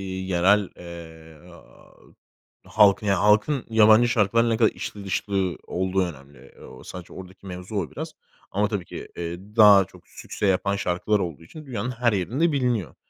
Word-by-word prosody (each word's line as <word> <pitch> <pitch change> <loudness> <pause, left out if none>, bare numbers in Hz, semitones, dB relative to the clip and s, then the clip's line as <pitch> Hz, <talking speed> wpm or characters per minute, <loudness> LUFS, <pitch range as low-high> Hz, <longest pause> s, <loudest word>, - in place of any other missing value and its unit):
yerel, 95 +1 +1
eee, 80 -1 -12 1.2
halkın 105 0 +3
ya 100 -3 +2
halkın 110 +6 +2
yabancı 110 +1 +5
şarkılarla 115 0 +2
ne 115 - +1
kadar 110 -1 +4
içli 100 -1 -8
dışlı 95 -2 -2
olduğu 95 +1 -1
önemli. 70 -5 -11
Eee, - - -15
sadece 90 -2 -10
oradaki 95 +1 -12
mevzu 90 +2 -8
o 85 -9 -2
biraz - - -6 0.4
ama 105 +2 +1
tabii 100 -4 -4
ki, - - -9
eee, 85 0 -4 0.2
daha 105 -3 +7
çok - - -19
sükse - - -6
yapan 100 +1 +1
şarkılar 100 +2 0
olduğu 85 -4 -5
için 155 - -12
dünyanın 125 -2 -4
her 120 -1 0
yerinde 120 - 0
biliniyor. 120 - -1
100 Hz, 155 wpm, -24 LUFS, 90-110 Hz, 1.2 s, daha